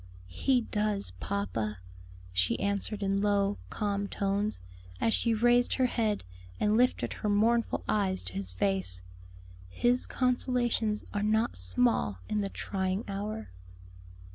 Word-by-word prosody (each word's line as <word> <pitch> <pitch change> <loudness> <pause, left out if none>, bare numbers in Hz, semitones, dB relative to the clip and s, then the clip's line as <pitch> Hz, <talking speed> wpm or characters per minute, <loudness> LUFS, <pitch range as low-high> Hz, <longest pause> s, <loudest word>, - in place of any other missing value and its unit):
"He 255 - +2
does, 210 - -1
papa," 115 - -2 0.6
she 90 0 +1
answered 200 +1 -2
in 195 0 +1
low, 205 0 +1
calm 200 -1 -1
tones, 200 +2 -1 0.4
as 225 - +2
she 230 -1 +2
raised 240 +2 +4
her 260 - +3
head 220 -4 0 0.4
and 210 +1 +2
lifted 250 +2 +2
her 210 - -3
mournful 225 +3 +2
eyes 195 -3 0
to 90 0 -7
his 95 -1 -3
face; 90 -1 +1 0.7
"His 245 - +1
consolations 245 -4 0
are 205 - -1
not 220 +2 +1
small 100 +3 +2
in 210 - 0
the 200 - -2
trying 190 +1 -2
hour." 195 - -4
205 Hz, 130 wpm, -30 LUFS, 185-225 Hz, 0.7 s, raised